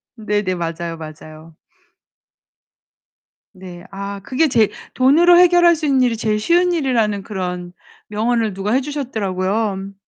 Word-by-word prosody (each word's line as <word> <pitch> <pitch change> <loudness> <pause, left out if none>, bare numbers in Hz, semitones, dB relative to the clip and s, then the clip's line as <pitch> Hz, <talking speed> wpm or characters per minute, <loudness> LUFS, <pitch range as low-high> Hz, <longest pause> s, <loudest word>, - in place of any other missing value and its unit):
네네 210 -4 -2
맞아요. 165 0 -4
맞아요. 155 0 -12 2.0
네. 180 -1 -11
아, 200 0 -6
그게 285 +8 +1
제일 230 -6 +2 0.2
돈으로 330 +7 +5
해결할 350 -1 +5
수 310 -1 -5
있는 270 -2 +2
일이 240 -3 +1
제일 215 -1 -1
쉬운 350 +8 +2
일이라는 230 -10 0
그런 180 -3 -5 0.4
명언을 220 0 -1
누가 195 +2 -3
해 265 - +2
주셨더라고요. 205 -7 -3
210 Hz, 280 characters per minute, -19 LUFS, 185-265 Hz, 2.0 s, 돈으로